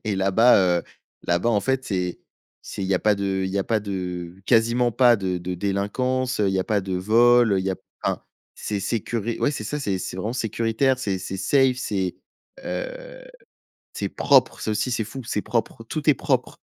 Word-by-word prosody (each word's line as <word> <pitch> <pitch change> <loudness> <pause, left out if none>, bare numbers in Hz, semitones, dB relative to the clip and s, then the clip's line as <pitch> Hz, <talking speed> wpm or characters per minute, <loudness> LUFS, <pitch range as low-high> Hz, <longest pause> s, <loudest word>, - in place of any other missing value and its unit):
Et 105 - -1
là-bas, 100 +6 +5 0.2
heu, - - -5 0.4
là-bas, 85 +6 +1
en 105 -3 +2
fait, 130 +2 -1
c'est 90 -3 -2 0.4
c'est - - -6
il 95 - -1
y 95 - +2
a 90 - +2
pas 105 -1 +3
de 95 -1 -1
il 95 - -2
y 100 - -1
a 95 - 0
pas 110 -2 +1
de 90 -3 -5
quasiment 120 0 +3
pas 120 0 +5
de 95 -2 -2
de 90 +1 -4
délinquance, 125 +7 -1
heu, 100 - +3
il 95 - -1
y - - +1
a 95 - 0
pas 105 -2 +1
de 95 0 -4
vol, 115 +4 +4
heu, 95 - +2
il 95 - -2
y 95 - 0
a 95 - -2 0.3
enfin, - - -1 0.3
c'est 105 -2 -3
sécuri 115 +2 -2
ouais, - - +2
c'est 135 -7 -5
ça, 150 +7 -3
c'est 100 -7 -1
c'est 90 - -5
vraiment 105 +5 -3
sécuritaire. 115 +2 0
C'est 100 -7 -2
c'est 95 +1 -5
safe, 130 +6 +3
c'est, 95 -7 -2 0.5
heu, - - -6 0.7
c'est - - -3
propre. - - +3
Ça 110 - -1
aussi, 110 +4 -1
c'est 115 -2 0
fou, 130 +5 -8
c'est 105 -2 -2
propre, 115 0 -2
tout 150 +5 -2
est - - +7
propre. - - -1
105 Hz, 215 wpm, -23 LUFS, 95-120 Hz, 0.7 s, est